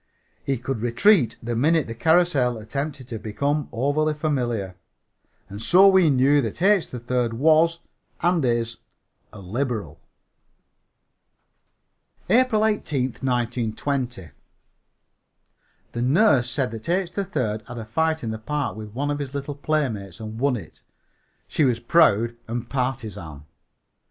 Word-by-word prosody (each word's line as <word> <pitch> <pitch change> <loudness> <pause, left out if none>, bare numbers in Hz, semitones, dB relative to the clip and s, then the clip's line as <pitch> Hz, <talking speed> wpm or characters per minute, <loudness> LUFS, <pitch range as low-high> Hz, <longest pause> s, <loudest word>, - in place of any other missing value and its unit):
He 135 -1 -1
could 125 -1 -4
retreat 120 - +3
the 120 0 -2
minute 155 +6 +2
the 115 - -6
carrousel 150 -3 +2
attempted 135 +4 -5
to 115 -3 -5
become 140 +8 -2
overly 145 +5 0
familiar. 120 - -2 0.7
And 100 +2 -8
so 185 +9 +6
we 190 -4 +5
knew 140 +2 +4
that 115 0 -4
H. 195 0 +3
3rd 125 -1 -2
was 160 +6 +3 0.4
and 175 -2 +2
is 115 -1 0 0.5
a 105 - -11
liberal. 105 - -4 2.3
APRIL 230 -2 +4
18, 155 -11 0 0.2
1920. 125 - -2 1.6
The 120 - -4
nurse 135 - +3
said 130 -1 -1
that 115 +5 -7
H. 180 0 0
3rd 125 - -3
had 120 - -8
a 115 - -6
fight 160 +7 0
in 110 - -2
the 110 - -5
park 130 -3 -3
with 105 0 -9
one 145 +3 -1
of 145 - -2
his 140 -1 -5
little 140 +1 -4
playmates 130 - -2
and 110 0 -7
won 135 0 +2
it. 95 -9 -10 0.7
She - - 0
was 125 -4 +2
proud 120 -4 +3
and 120 +1 -4
partisan. 110 - -4
130 Hz, 130 wpm, -23 LUFS, 115-155 Hz, 2.3 s, so